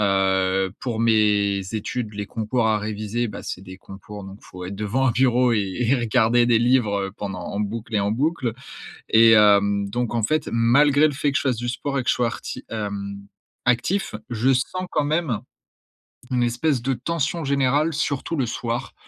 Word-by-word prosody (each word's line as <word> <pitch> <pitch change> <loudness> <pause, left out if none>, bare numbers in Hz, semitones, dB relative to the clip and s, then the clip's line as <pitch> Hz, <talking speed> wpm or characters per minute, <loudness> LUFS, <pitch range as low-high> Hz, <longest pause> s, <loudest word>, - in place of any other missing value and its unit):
heu, 95 -1 +2
pour 115 -3 -3
mes 105 -3 +2
études, 110 +1 -3
les 105 -1 -5
concours 110 +2 -1
à 110 -1 +2
réviser, 110 +3 -3
bah, 105 - -7
c'est 90 - -6
des 95 0 -11
concours 100 +2 -10
donc 95 +1 -10
il - - -18
faut 90 0 -8
être 100 - -6
devant 110 +6 0
un 125 - +3
bureau 125 0 +3
et 105 -3 +1 0.2
et 125 +2 +3
regarder 120 0 +3
des 120 -1 +4
livres, 120 -4 +2
heu, - - -9
pendant 95 -3 -5
en 100 - -4
boucle 110 +2 -4
et 105 - +3
en 100 +1 0
boucle 130 -1 0 0.6
et 115 +1 +7
hem, 100 -2 +4
donc 120 +2 -2
en 115 - 0
fait, 155 +3 0
malgré 140 +6 +4
le 150 - -1
fait 145 +1 0
que 140 - -1
je - - -3
fasse 130 -4 0
du 120 +1 -4
sport 140 +3 -2
et - - -3
que - - -7
je - - +2
sois 125 - +1
arti 115 - -6
hem, 100 -2 -5 0.4
actif. 125 - 0 0.2
Je 120 +3 +2
sens 185 +9 -1
quand 150 - 0
même, 150 -6 0 0.9
une 125 -1 +2
espèce 120 +2 0
de 135 +2 0
tension 165 +5 -2
générale, 140 +3 +1
surtout 145 +1 -2
le 135 -4 0
soir, 115 +1 -4
115 Hz, 200 wpm, -23 LUFS, 105-130 Hz, 0.9 s, et